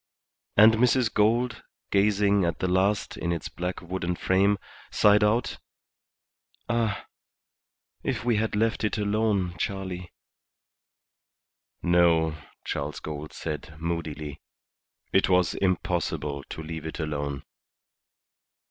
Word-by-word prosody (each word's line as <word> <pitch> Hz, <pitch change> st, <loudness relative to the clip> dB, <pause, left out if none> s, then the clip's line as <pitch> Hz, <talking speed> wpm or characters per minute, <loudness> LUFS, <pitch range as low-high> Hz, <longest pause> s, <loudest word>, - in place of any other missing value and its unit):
And 110 Hz, +2 st, +8 dB
Mrs. 125 Hz, 0 st, +3 dB
Gould, 110 Hz, +2 st, +2 dB, 0.3 s
gazing 100 Hz, 0 st, +3 dB
at 85 Hz, -2 st, 0 dB
the 95 Hz, -, -1 dB
last 95 Hz, +2 st, +1 dB
in 85 Hz, -, -2 dB
its 85 Hz, -3 st, -3 dB
black 90 Hz, +1 st, -4 dB
wooden 90 Hz, 0 st, -2 dB
frame, 100 Hz, +3 st, +2 dB, 0.3 s
sighed 105 Hz, 0 st, +5 dB
out 110 Hz, +4 st, +1 dB, 1.1 s
"Ah, 115 Hz, -3 st, 0 dB, 1.0 s
if -, -, -2 dB
we 120 Hz, -3 st, +3 dB
had 110 Hz, 0 st, 0 dB
left 110 Hz, +2 st, +1 dB
it 105 Hz, -, 0 dB
alone, 105 Hz, -3 st, 0 dB
Charley!" 95 Hz, -3 st, -4 dB, 1.7 s
"No," 85 Hz, -2 st, +4 dB, 0.3 s
Charles 70 Hz, +1 st, -3 dB
Gould 75 Hz, -1 st, -6 dB
said, 75 Hz, 0 st, -6 dB
moodily; 80 Hz, -3 st, -4 dB, 0.7 s
"it 95 Hz, -, +4 dB
was 90 Hz, -2 st, +3 dB
impossible 85 Hz, -6 st, -1 dB
to 80 Hz, -, -6 dB
leave 80 Hz, 0 st, -6 dB
it 80 Hz, -, -6 dB
alone." 70 Hz, -3 st, -3 dB
90 Hz, 110 wpm, -27 LUFS, 80-105 Hz, 1.7 s, And